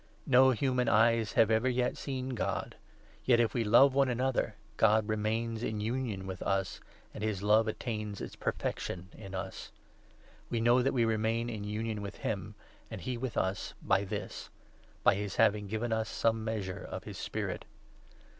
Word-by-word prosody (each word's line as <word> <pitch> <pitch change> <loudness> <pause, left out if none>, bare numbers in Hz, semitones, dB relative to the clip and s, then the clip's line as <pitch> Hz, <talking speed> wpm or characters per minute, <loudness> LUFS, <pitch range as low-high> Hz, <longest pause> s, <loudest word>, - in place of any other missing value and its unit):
No 130 0 +6
human 125 -1 +1
eyes 115 0 +3
have 115 -1 +4
ever 115 +4 +3 0.2
seen 130 -2 -4
God; 125 -4 -2 0.5
yet, 125 - +5
12 120 0 +4
if - - -5
we 120 - +1
love 120 +6 +6
one 135 -1 +3
another, 130 +1 0 0.2
God 110 -1 +4
remains 110 +1 -1
in 110 -3 -2
union 110 -3 -2
with 95 0 -6
us, 95 -1 -1 0.3
and - - -6
his 105 -3 -1
love 110 +2 +4
attains 105 -2 -3
its - - -6
perfection 90 +1 -3
in 95 -3 -8
us. 95 0 -6 0.8
We 115 - 0
know 120 +2 +4
that 135 +2 +1
we 120 -2 +3
remain 115 +1 0
13 115 - -4
in 105 - -5
union 110 0 -2
with 100 -1 -6
him, - - -4 0.3
and - - -7
he 130 - -3
with 120 -1 -4
us, 95 +1 -1
by 100 0 +2
this 95 - -5 0.3
— - - -30
by - - +6
his 100 0 -3
having 105 -2 +3
given 110 +3 -2
us 110 -1 -1
some 115 -1 +1
measure 105 -5 -3
of - - -6
his - - -8
Spirit. - - -3
110 Hz, 180 wpm, -31 LUFS, 105-120 Hz, 0.8 s, No